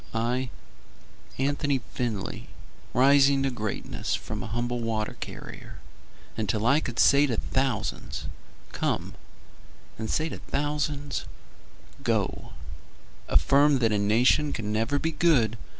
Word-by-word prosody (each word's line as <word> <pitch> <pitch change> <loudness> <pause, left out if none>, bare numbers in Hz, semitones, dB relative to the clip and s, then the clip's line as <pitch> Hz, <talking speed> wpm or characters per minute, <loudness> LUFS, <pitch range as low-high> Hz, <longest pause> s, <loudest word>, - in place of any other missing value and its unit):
I, 125 +3 0 0.9
Anthony 140 +1 +1 0.2
Findlay, 110 -6 -3 0.4
rising 135 +2 +5
to 135 - +1
greatness 110 -4 -3
From - - -5
a - - -5
humble 120 +1 -2
water 110 -2 -2
carrier, - - -8 0.6
Until 110 0 -1
I 140 +5 +5
could 120 -6 -6
say 140 +1 +6
to 120 -5 -1
thousands 130 +3 -2 0.5
"Come," - - -2 0.9
And 110 0 -3
say 155 - +1
to - - -7
thousands 145 -1 -2 0.8
"Go," - - -1 0.7
Affirm 140 +1 +4
that 115 -3 +2
a 105 - +2
nation 120 +8 +3
can 105 -1 -3
never 115 +6 +1
be 160 +3 -1
good. 150 -9 +3
130 Hz, 120 wpm, -27 LUFS, 115-145 Hz, 0.9 s, say